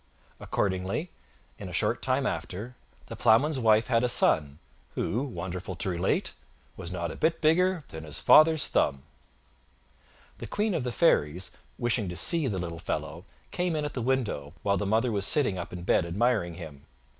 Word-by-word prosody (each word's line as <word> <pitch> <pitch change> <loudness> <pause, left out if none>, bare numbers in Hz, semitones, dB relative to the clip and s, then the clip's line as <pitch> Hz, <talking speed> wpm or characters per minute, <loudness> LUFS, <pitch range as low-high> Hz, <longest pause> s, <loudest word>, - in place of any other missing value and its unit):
Accordingly, 95 - -2 0.5
in - - -7
a - - -9
short - - 0
time - - 0
after, 115 +7 -4 0.3
the - - -8
Ploughman's 135 +7 +3
wife 110 -1 +4
had 120 -2 +2
a 125 - +2
son, 75 -10 +2 0.4
who, 120 - -1
wonderful 95 -5 -5
to 90 - -1
relate! 90 +1 0 0.4
was 90 -2 -6
not 85 -3 -3
a - - -8
bit 165 +1 +1
bigger 175 +2 +2
than 80 0 -8
his 75 -1 -5
father's 155 -1 +6
thumb. 70 -1 0 1.4
The - - -6
Queen 210 0 -1
of 160 - -1
the 125 - -2
fairies, 90 - +2 0.3
wishing 120 -5 0
to 90 - -6
see 150 - +3
the 100 -6 -2
little 85 -2 -5
fellow, - - -4 0.3
came 180 -2 -1
in 150 -1 -1
at 145 - -4
the 125 - -3
window, 115 - -1
while 100 0 +2
the 100 +1 -2
mother 115 +4 +2
was 100 -2 0
sitting 130 - +2
up 85 - -6
in 90 -1 -7
bed 90 - +3
admiring 100 -2 0
him. 80 -5 -10
105 Hz, 180 wpm, -28 LUFS, 90-135 Hz, 1.4 s, father's